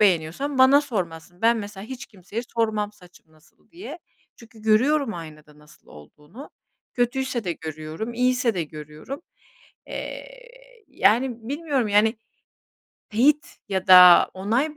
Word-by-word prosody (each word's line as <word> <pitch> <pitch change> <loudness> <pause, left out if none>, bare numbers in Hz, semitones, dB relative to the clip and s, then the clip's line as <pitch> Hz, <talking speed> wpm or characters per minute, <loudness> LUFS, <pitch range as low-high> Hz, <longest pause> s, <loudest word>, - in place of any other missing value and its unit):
beğeniyorsan 195 - +1
bana 265 +2 +6
sormazsın. 175 - -6
Ben 230 +1 +4
mesela 205 -2 -7
hiç 260 +2 -8
kimseye 200 +3 -7
sormam 220 -3 -2
saçım 180 -5 -21
nasıl 155 +1 -27
diye 340 -1 -9 0.4
çünkü 225 -1 -17
görüyorum 240 +3 +2
aynada 155 -2 -11
nasıl 150 0 -21
olduğunu, 150 - -14 0.4
kötüyse 245 -1 -1
de 175 - -1
görüyorum, 160 +8 -7
iyiyse 250 -1 +1
de 175 - -1
görüyorum. 155 - -9 0.6
Eee, - - -7 0.6
yani, 235 0 +1
bilmiyorum 285 -5 -1
yani, 210 +2 +3 1.0
teyit 280 +7 +1
ya 190 -2 -2
da, 180 -1 +8
onay 235 +11 -1
215 Hz, 120 wpm, -23 LUFS, 175-255 Hz, 1.0 s, da